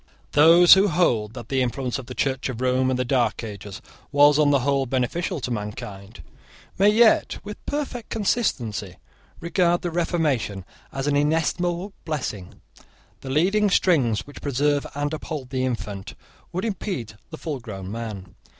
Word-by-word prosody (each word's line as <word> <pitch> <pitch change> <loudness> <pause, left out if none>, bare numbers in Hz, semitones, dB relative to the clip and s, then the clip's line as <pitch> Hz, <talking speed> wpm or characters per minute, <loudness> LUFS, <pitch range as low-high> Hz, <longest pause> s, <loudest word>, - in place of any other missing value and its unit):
Those 165 +4 +8
who 195 +2 +5
hold 120 - +1
that 120 - -9
the 135 -1 +1
influence 125 +1 -2
of 125 - -9
the 125 - -8
Church 135 -1 -1
of 120 -3 -5
Rome 130 0 +1
in 130 - 0
the 125 - -1
dark 125 -2 0
ages 100 -2 -8 0.3
was, 145 +1 +5
on 150 -1 +4
the 140 -2 +3
whole, 135 0 +1
beneficial 135 +8 -1
to 125 - -3
mankind, 105 -1 -6 0.6
may 200 +2 +6
yet 220 +1 +4
with 210 0 -8
perfect 280 -5 -4
consistency 120 - -1 0.4
regard 175 0 +1
the 175 - -2
Reformation 150 - -1 0.3
as 135 0 -4
an 145 -1 +1
inestimable 170 +5 0
blessing. 125 - -5 0.6
The 135 - -8
leading 195 +9 +2
strings, 135 - +2
which 145 - -12
preserve 145 +1 0
and 145 +1 -2
uphold 150 -4 -6
the 130 -1 -1
infant, 105 -5 -5 0.4
would 185 +5 -3
impede 190 - -4 0.2
the 160 - -8
fullgrown 115 - -6
man. 105 -5 -6
140 Hz, 155 wpm, -24 LUFS, 120-170 Hz, 0.6 s, Those